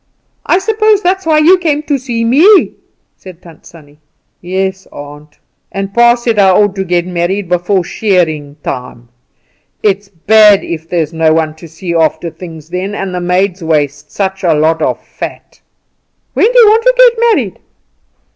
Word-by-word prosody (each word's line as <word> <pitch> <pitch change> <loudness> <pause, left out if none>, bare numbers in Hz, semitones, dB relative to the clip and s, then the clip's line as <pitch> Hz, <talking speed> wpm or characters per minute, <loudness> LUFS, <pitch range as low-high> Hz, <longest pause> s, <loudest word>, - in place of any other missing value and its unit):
"I - - +3
suppose 430 +1 +1
that's 370 0 -1
why 310 -1 +3
you 345 +5 +4
came 305 -4 -1
to 285 -3 -1 0.2
me," 325 - +4 0.4
said 185 -3 -13
Tant 165 -3 -17
Sannie. 150 -3 -17 0.4
"Yes, 190 +1 -3
aunt. 145 +1 -12 0.3
And 195 0 -5
pa 235 +1 +4
said 235 -3 -2
I 195 -1 +5
ought 205 +1 +2
to 190 - -1
get 175 -1 -1
married 180 +2 -2
before 180 +2 0
shearing 165 -8 -1
time. 125 -2 -7 0.7
It 200 -2 +2
is 205 -1 -25
bad 210 +3 +4
if 165 -1 -7
there's 165 -3 -2
no 160 -1 +2
one 160 -1 -1
to 170 - -12
see 170 +2 -6
after 160 0 0
things 160 -2 -11
then; 185 +3 -4
and 195 -2 -5
the 180 - -3
maids 180 +1 -1
waste 150 -2 -2
such 195 -1 -4
a 170 -3 +2
lot 160 +2 +1
of - - -1
fat." - - -9 0.7
"When 455 - +2
do - - +4
you - - +7
want 440 +2 +4
to - - +5
get 470 -2 +4
married?" - - -4
185 Hz, 170 wpm, -12 LUFS, 160-235 Hz, 0.7 s, you